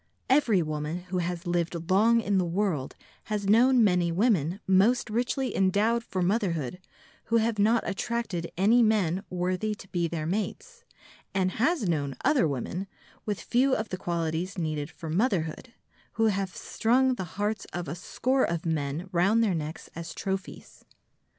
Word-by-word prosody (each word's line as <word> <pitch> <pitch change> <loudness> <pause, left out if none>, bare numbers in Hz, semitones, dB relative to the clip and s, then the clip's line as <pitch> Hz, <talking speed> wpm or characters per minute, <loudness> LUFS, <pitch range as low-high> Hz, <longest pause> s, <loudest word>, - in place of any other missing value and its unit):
Every 230 - +4
woman 155 +2 -3
who 180 - +1
has 175 +1 -3
lived 170 -1 -2
long 230 +4 +5
in 200 -2 +1
the - - +2
world 175 -6 -1 0.3
has 210 -2 -2
known 240 +4 +5
many 180 -4 +2
women 185 - +1
most 215 +5 +3
richly 250 +3 -1
endowed 210 +5 +2
for 185 -5 -2
motherhood 180 - -1 0.5
who 230 - +2
have 225 -1 0
not 225 +3 +3
attracted 195 -4 -3
any 220 +6 +5
men 200 -5 +2
worthy 185 +4 -1
to 195 - -13
be 170 -2 0
their 160 -2 -4
mates, 345 - -4 0.5
and 185 -1 +2
has 270 - +1
known 145 -5 -1
other 275 - +4
women, 155 +8 -3 0.4
with 205 -2 -1
few 260 +2 +2
of 220 0 -3
the 185 - -3
qualities 170 +1 -2
needed 155 -3 -2
for 165 - -9
motherhood, 185 +1 -1 0.4
who 225 0 +2
have 195 -2 -2
strung 255 +3 +2
the 220 - -4
hearts 210 0 -1
of 175 -1 -4
a 145 - -3
score 255 +9 0
of 170 -1 -1
men 155 +1 -2
round 195 +6 +3
their 205 -4 +2
necks 155 -1 -5
as 165 0 -7
trophies. 195 0 -5
190 Hz, 160 wpm, -27 LUFS, 170-225 Hz, 0.5 s, long